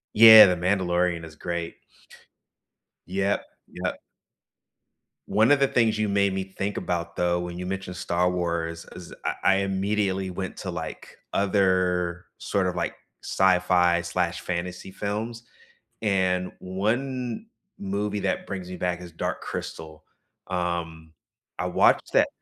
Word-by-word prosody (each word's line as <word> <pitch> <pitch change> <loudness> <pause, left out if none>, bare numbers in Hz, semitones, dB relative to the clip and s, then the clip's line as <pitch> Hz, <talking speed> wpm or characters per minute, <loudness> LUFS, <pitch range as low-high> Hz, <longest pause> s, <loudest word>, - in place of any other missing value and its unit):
Yeah, 110 -1 +11
The 90 - +2
Mandalorian 90 -2 0
is 80 -2 -12
great. 85 0 -4 1.3
Yep, 95 +2 0 0.2
yep. - - -4 1.3
One 110 +4 +3
of 145 - +4
the 140 - +4
things 115 -3 +2
you 110 - +1
made 100 -1 +2
me 95 - -2
think 100 +1 -2
about, 85 -1 -3
though, 90 0 +1
when 90 0 -5
you 90 - -5
mentioned 95 -1 -4
Star 90 +1 +1
Wars 85 -2 -2
is 90 -2 -10
I - - 0
I 95 - +5
immediately 95 0 0
went 95 +1 -5
to, 95 - -4
like, 80 -2 -7
other 90 -3 +1
sort 100 -2 0
of, 90 - -1
like, 85 -1 -2 0.3
sci-fi/fantasy 90 0 +1
films, 110 +4 -4 0.6
and 95 -3 +1
one 120 - -2 0.3
movie 100 +1 -2
that 95 -1 -1
brings 95 -2 -5
me 90 - -5
back 90 -1 -2
is 90 -2 -10
Dark - - -3
Crystal, 80 0 -7 0.4
um, 85 -3 -3 0.5
I - - -1
watched - - +3
that - - +5
90 Hz, 130 wpm, -25 LUFS, 85-100 Hz, 1.3 s, Yeah